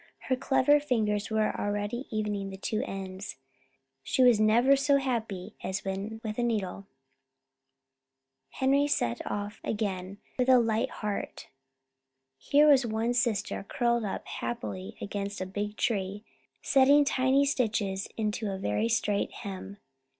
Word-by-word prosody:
Her 260 Hz, -, +4 dB
clever 265 Hz, +2 st, +3 dB
fingers 215 Hz, -7 st, 0 dB
were 220 Hz, -1 st, +1 dB
already 205 Hz, +5 st, -2 dB
evening 210 Hz, -2 st, -2 dB
the 190 Hz, -, -8 dB
two 215 Hz, +2 st, -2 dB
ends. 190 Hz, 0 st, -6 dB, 0.6 s
She 260 Hz, -, +2 dB
was 245 Hz, -4 st, +6 dB
never 235 Hz, +6 st, +5 dB
so 280 Hz, +1 st, +3 dB
happy 230 Hz, -8 st, -3 dB
as 190 Hz, +1 st, -3 dB
when 195 Hz, +3 st, -4 dB
with 215 Hz, +1 st, -4 dB
a -, -, +2 dB
needle. 200 Hz, -4 st, -2 dB, 1.6 s
Henry 275 Hz, +2 st, +2 dB
set 120 Hz, -, 0 dB
off 205 Hz, +1 st, -4 dB
again 195 Hz, -3 st, -3 dB, 0.2 s
with 250 Hz, +1 st, +2 dB
a 255 Hz, -, +8 dB
light 230 Hz, +1 st, +1 dB
heart. 210 Hz, -2 st, -5 dB, 0.9 s
Here 295 Hz, -, +4 dB
was 275 Hz, -3 st, +6 dB
one 225 Hz, +1 st, -1 dB
sister 235 Hz, -4 st, 0 dB
curled 235 Hz, +2 st, 0 dB
up 200 Hz, -, -4 dB
happily 100 Hz, -5 st, -5 dB
against 200 Hz, 0 st, -4 dB
a 185 Hz, -, -2 dB
big 205 Hz, +2 st, -4 dB
tree, 205 Hz, -1 st, -1 dB, 0.4 s
setting 280 Hz, +1 st, +5 dB
tiny 265 Hz, +1 st, +3 dB
stitches 215 Hz, -7 st, 0 dB
into 215 Hz, -1 st, -1 dB
a 190 Hz, -, -3 dB
very 190 Hz, -, 0 dB
straight 210 Hz, -3 st, 0 dB
hem. 195 Hz, 0 st, -7 dB
215 Hz, 135 wpm, -29 LUFS, 200-250 Hz, 1.6 s, a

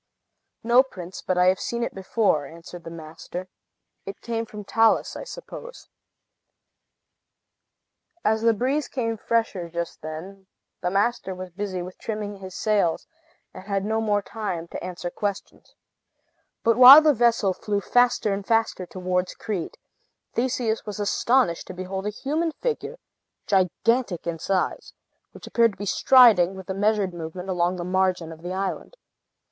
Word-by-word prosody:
"No, 240 Hz, +2 st, +6 dB
prince; 185 Hz, -9 st, -8 dB
but 185 Hz, -, -1 dB
I 180 Hz, -, +4 dB
have 185 Hz, 0 st, +3 dB
seen 235 Hz, 0 st, -2 dB
it -, -, -3 dB
before," 190 Hz, -6 st, 0 dB
answered 170 Hz, +2 st, -11 dB
the -, -, -6 dB
master. 165 Hz, +3 st, -8 dB, 0.6 s
"It 195 Hz, -, -8 dB
came 230 Hz, -1 st, -3 dB
from 210 Hz, -1 st, -8 dB
Talus, 225 Hz, +2 st, +2 dB
I -, -, -6 dB
suppose." -, -, -10 dB, 2.4 s
As 220 Hz, 0 st, +2 dB
the 230 Hz, 0 st, +3 dB
breeze 270 Hz, +6 st, 0 dB
came 230 Hz, -4 st, -2 dB
fresher 220 Hz, -6 st, -1 dB
just 170 Hz, -1 st, -5 dB
then, 180 Hz, +5 st, -8 dB, 0.3 s
the 180 Hz, -, 0 dB
master 200 Hz, 0 st, 0 dB
was 185 Hz, 0 st, -8 dB
busy 185 Hz, -1 st, -4 dB
with 180 Hz, +1 st, -10 dB
trimming 210 Hz, -2 st, -4 dB
his 190 Hz, -1 st, -9 dB
sails, 205 Hz, -6 st, +1 dB, 0.5 s
and 185 Hz, -, -11 dB
had 200 Hz, -1 st, -1 dB
no 220 Hz, +1 st, 0 dB
more 205 Hz, -2 st, +1 dB
time 200 Hz, -6 st, -4 dB
to -, -, -7 dB
answer 180 Hz, -1 st, -5 dB
questions. 205 Hz, 0 st, -5 dB, 0.9 s
But 230 Hz, 0 st, +3 dB
while 265 Hz, +5 st, +11 dB
the 305 Hz, -1 st, +5 dB
vessel 230 Hz, -5 st, +2 dB
flew 205 Hz, +2 st, -2 dB
faster 245 Hz, 0 st, +2 dB
and 195 Hz, 0 st, -3 dB
faster 225 Hz, -4 st, 0 dB
towards 180 Hz, 0 st, -2 dB
Crete, 200 Hz, -7 st, -4 dB, 0.6 s
Theseus 235 Hz, -2 st, -1 dB
was 210 Hz, -1 st, -6 dB
astonished 205 Hz, -2 st, +1 dB
to 185 Hz, -, -8 dB
behold 190 Hz, +2 st, -4 dB
a -, -, +1 dB
human 305 Hz, +9 st, -2 dB
figure, 485 Hz, +3 st, -3 dB, 0.5 s
gigantic 200 Hz, +1 st, +1 dB
in 170 Hz, -1 st, -3 dB
size, 190 Hz, +2 st, -2 dB, 0.4 s
which -, -, -12 dB
appeared 230 Hz, -2 st, +3 dB
to -, -, -18 dB
be 205 Hz, -, -5 dB
striding, 205 Hz, -5 st, +6 dB
with 190 Hz, 0 st, -7 dB
a -, -, -1 dB
measured 205 Hz, -1 st, +1 dB
movement, 175 Hz, +3 st, -7 dB
along 180 Hz, 0 st, +1 dB
the 175 Hz, -, -5 dB
margin 185 Hz, -2 st, 0 dB
of 160 Hz, 0 st, -11 dB
the 175 Hz, +1 st, -5 dB
island. 195 Hz, -, -4 dB
195 Hz, 155 wpm, -24 LUFS, 180-230 Hz, 2.4 s, while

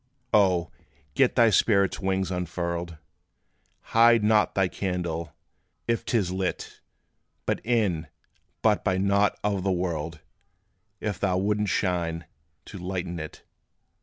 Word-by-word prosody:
O! 95 Hz, -5 st, +3 dB, 0.4 s
get 135 Hz, -2 st, +3 dB
thy 115 Hz, -3 st, +5 dB
spirit's 100 Hz, -2 st, +3 dB
wings 95 Hz, -1 st, -1 dB
unfurled! 85 Hz, -1 st, -3 dB, 1.0 s
Hide 115 Hz, -1 st, +6 dB
not 105 Hz, 0 st, +3 dB
thy 95 Hz, -1 st, +3 dB
candle, 85 Hz, -4 st, -3 dB, 0.5 s
if 115 Hz, 0 st, 0 dB
't 120 Hz, -, +1 dB
is 95 Hz, -5 st, 0 dB
lit: 95 Hz, 0 st, -4 dB, 0.6 s
Be -, -, 0 dB
in, 100 Hz, -9 st, 0 dB, 0.6 s
but -, -, +3 dB
be 95 Hz, -, +1 dB
not 100 Hz, +1 st, +2 dB
of 100 Hz, -2 st, 0 dB
the 95 Hz, -, +1 dB
world, 85 Hz, -3 st, -2 dB, 0.8 s
If 105 Hz, -4 st, -3 dB
thou 95 Hz, -2 st, +1 dB
wouldst 105 Hz, 0 st, 0 dB
shine 85 Hz, -3 st, -1 dB, 0.4 s
to 100 Hz, -, -9 dB
lighten 90 Hz, -1 st, -4 dB
it. 80 Hz, -1 st, -8 dB
95 Hz, 125 wpm, -26 LUFS, 85-105 Hz, 1.0 s, Hide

